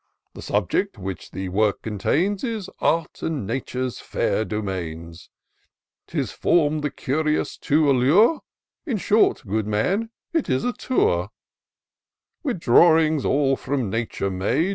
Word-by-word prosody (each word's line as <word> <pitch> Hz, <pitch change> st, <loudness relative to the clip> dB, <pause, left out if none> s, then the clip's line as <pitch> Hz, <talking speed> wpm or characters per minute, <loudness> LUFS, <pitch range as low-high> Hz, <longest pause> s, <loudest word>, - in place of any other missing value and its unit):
The -, -, -10 dB
subject 105 Hz, -, -1 dB
which 95 Hz, -1 st, -6 dB
the 95 Hz, -1 st, -5 dB
work 105 Hz, +2 st, +1 dB
contains 160 Hz, -, 0 dB
Is 225 Hz, -6 st, -3 dB
Art 165 Hz, 0 st, 0 dB
and 155 Hz, -9 st, -2 dB
Nature's 125 Hz, +2 st, -3 dB
fair -, -, -1 dB
domains; 85 Hz, -6 st, -5 dB, 0.8 s
'Tis -, -, -2 dB
form'd 155 Hz, -3 st, +1 dB
the 150 Hz, -, 0 dB
curious 155 Hz, +3 st, -1 dB
to 150 Hz, +1 st, +2 dB
allure; 150 Hz, -, +4 dB, 0.2 s
— -, -, -63 dB
In 245 Hz, -7 st, 0 dB
short, 210 Hz, +3 st, +2 dB
good 105 Hz, +1 st, -1 dB
man, 185 Hz, -, 0 dB, 0.2 s
it 325 Hz, -4 st, 0 dB
is 130 Hz, -1 st, +1 dB
a 245 Hz, -, 0 dB
Tour; 90 Hz, -, 0 dB, 1.1 s
With 260 Hz, -, -2 dB
drawings 160 Hz, +2 st, +4 dB
all 135 Hz, -1 st, +2 dB
from 130 Hz, -6 st, -2 dB
nature 110 Hz, -3 st, -2 dB
made. 120 Hz, -, 0 dB
135 Hz, 135 wpm, -23 LUFS, 105-165 Hz, 1.1 s, allure